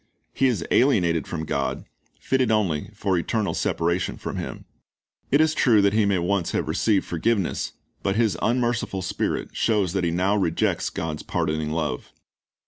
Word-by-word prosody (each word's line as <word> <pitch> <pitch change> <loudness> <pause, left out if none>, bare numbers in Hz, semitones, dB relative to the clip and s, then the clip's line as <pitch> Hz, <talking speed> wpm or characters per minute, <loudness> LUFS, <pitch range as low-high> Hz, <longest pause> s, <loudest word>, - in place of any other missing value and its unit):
"^ - - -42 0.3
He 135 - +2
is 110 -10 0
alienated 90 - +3
from 80 -2 -4
God, - - -2 0.3
fitted 130 -1 +1
only 95 -9 0
for 95 -2 0
eternal 110 +4 -1
separation 85 +1 -1
from - - -5
Him. - - -6 0.6
It 140 - +4
is 160 0 +3
true 115 -8 +4
that 100 0 +3
he 110 -1 +3
may 100 -2 +2
once 90 0 0
have - - -1
received 105 -4 +1
forgiveness; 100 +3 -1 0.3
but 95 - 0
his 110 -2 +2
unmerciful 120 -5 0
spirit 90 - -2
shows 105 -6 +1
that 95 -2 0
he 85 - +2
now 90 +4 +1
rejects 90 -5 0
God's 75 -2 -4
pardoning 80 -3 -1
love. 75 -5 -3
95 Hz, 165 wpm, -24 LUFS, 85-110 Hz, 0.6 s, It